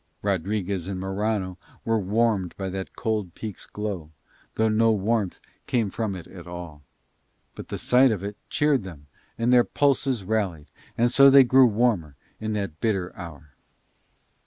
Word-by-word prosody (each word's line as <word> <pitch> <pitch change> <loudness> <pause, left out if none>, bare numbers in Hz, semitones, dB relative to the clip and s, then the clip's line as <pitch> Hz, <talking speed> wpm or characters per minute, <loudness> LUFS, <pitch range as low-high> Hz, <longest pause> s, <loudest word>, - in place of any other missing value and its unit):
Rodriguez 100 -1 -1
and 95 -2 -4
Morano 95 -1 -2 0.3
were 115 -1 +2
warmed 105 -2 0
by 95 -1 -3
that 95 0 -6
cold 105 -6 -2
peak's 105 -5 -7
glow, 100 -7 -5 0.5
though 110 - +2
no 110 +1 +3
warmth 105 -1 0 0.3
came 115 -5 0
from 110 -2 -2
it 90 - -8
at 90 -2 -12
all; 85 -4 -8 0.7
but - - -9
the - - -4
sight 130 +2 +4
of 100 -3 -3
it 100 +1 -5
cheered 145 -5 +2
them 80 -6 -10 0.3
and 115 +2 +2
their 125 -1 +7
pulses 135 -5 +1
rallied, 95 -7 -2 0.3
and 120 +1 +3
so 140 +2 +7
they 135 0 +8
grew 130 +1 +6
warmer 105 - 0 0.2
in 110 0 -3
that 100 -7 -4
bitter 95 -5 -1
hour. 80 -4 -10
105 Hz, 160 wpm, -25 LUFS, 90-115 Hz, 0.7 s, they